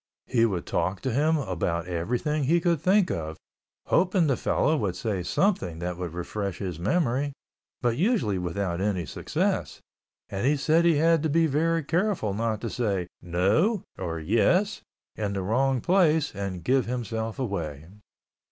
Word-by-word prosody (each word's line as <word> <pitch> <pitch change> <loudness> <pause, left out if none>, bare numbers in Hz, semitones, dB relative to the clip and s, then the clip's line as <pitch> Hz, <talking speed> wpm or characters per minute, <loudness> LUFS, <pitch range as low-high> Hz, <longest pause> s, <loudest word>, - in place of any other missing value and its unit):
He 115 -2 +3
would 90 -5 -3
talk 95 +3 -1
to 130 - -1
him 155 +5 +3
about 90 - -2
everything 120 - -1
he 170 +5 +3
could 170 -3 +1
think 195 0 +3
of, 80 -1 -4 0.5
hoping 180 0 +3
the 135 -4 +2
fellow 155 - +1
would 100 - -1
say 100 -1 -2
something 95 - 0
that 90 +1 -3
would 85 -1 -5
refresh 100 +1 -3
his 90 -5 -5
memory 140 - 0 0.5
but 120 -1 +1
usually 170 - +1
without 90 0 -2
any 95 -4 0
success, - - -2 0.5
and 100 +6 -2
he 150 +1 +3
said 160 +4 +3
he 170 -2 +5
had 165 +1 +3
to 160 - 0
be 165 +3 +3
very 160 +2 +1
careful 170 - 0
to 100 - -4
not 115 0 -1
say 100 -7 -1 0.2
"No" 100 - +1
or 85 -3 -4
"Yes" 170 - +2 0.3
in 105 -2 -2
the 95 -1 -2
wrong 130 +5 +1
place 165 -5 +3
and 100 -3 -4
give 130 -1 +2
himself 115 -2 -3
away. 85 - -3
115 Hz, 160 wpm, -26 LUFS, -, 0.5 s, he